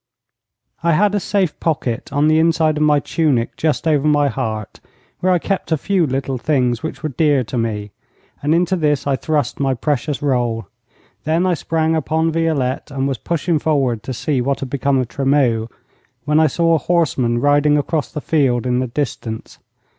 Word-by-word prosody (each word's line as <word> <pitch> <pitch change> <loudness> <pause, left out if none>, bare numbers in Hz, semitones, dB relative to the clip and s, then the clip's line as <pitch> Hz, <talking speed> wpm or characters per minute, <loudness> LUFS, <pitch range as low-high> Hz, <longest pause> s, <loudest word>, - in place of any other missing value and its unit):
I 170 0 +2
had 205 +5 +3
a 205 - +1
safe 190 -4 -1
pocket 135 -8 -2
on 145 +1 +2
the 155 0 +4
inside 160 -1 +2
of - - -1
my 150 -1 +4
tunic 140 -6 0
just 155 +1 -1
over 150 -2 +2
my 145 -1 +3
heart, 110 -6 -4 0.4
where 185 - +1
I 180 - +4
kept 190 0 -3
a 160 - +3
few 185 +1 +1
little 135 -1 -2
things 125 -5 0
which 160 - -6
were 155 - -1
dear 145 -1 +2
to 120 - -7
me, 105 -3 -3 0.5
and 150 +3 +2
into 175 +2 +2
this 150 -5 0
I 140 -1 +1
thrust 150 -1 -1
my 135 -2 +1
precious 145 +2 -1
roll. 120 -5 0 0.6
Then 165 +4 +1
I 185 - +2
sprang 160 0 0
upon 160 +1 0
Violette, 155 -5 -1
and 135 -1 -2
was 135 -5 -3
pushing 170 - -1
forward 135 -8 0
to 120 - -6
see 130 +1 -1
what 140 +2 -1
had 130 -2 -5
become 140 0 +1
of 130 -2 0
Tremeau, 130 -4 +1 0.6
when 150 +1 +3
I 160 - +5
saw 165 +3 +2
a - - +4
horseman 135 -10 +1
riding 145 +2 +3
across 145 -1 -1
the 150 - -5
field 130 -7 +1
in 125 0 +1
the 130 - -1
distance. 115 -4 -5
145 Hz, 190 wpm, -19 LUFS, 130-160 Hz, 0.6 s, I